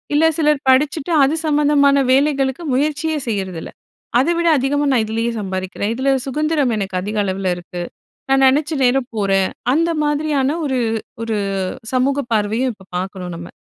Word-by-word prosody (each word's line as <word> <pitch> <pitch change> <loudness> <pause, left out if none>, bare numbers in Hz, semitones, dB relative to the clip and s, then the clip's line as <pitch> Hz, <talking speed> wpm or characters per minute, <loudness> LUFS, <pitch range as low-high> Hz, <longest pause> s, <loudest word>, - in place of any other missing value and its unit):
இல்ல 315 - +4
சிலர் 300 -2 +2
படிச்சுட்டு, 285 +4 +2
அது 285 +4 +2
சம்மந்தமான 290 -2 +3
வேலைகளுக்கு 275 +2 +1
முயற்சியே 300 +3 0
செய்றதில்ல. 190 -6 -3 0.5
"அத 270 - +2
விட 340 - +1
அதிகமா 285 +2 0
நான் 230 -3 +3
இதிலயே 225 +2 -1
சம்பாதிக்கிறேன். 190 +1 -3
இதில 265 +2 0 0.2
சுதந்திரம் 295 -3 0
எனக்கு 195 -2 -3
அதிக 210 +2 -4
அளவில 190 -1 -1
இருக்கு. 175 0 -7 0.5
நான் 270 0 +4
நினச்ச 295 +4 +1
நேரம் 250 0 +1
போறேன்" 195 -2 +1 0.2
அந்த 335 +2 +2
மாதிரியான 295 -2 0 0.2
ஒரு 265 -2 0 0.5
ஒரு 220 -2 -2 0.6
சமூக 275 +2 +2
பார்வையும் 220 +5 0
இப்போ 190 -2 -19
பார்க்கறோம் 185 -1 -5
நம்ம. 170 +1 -8
265 Hz, 145 wpm, -19 LUFS, 205-290 Hz, 0.6 s, இல்ல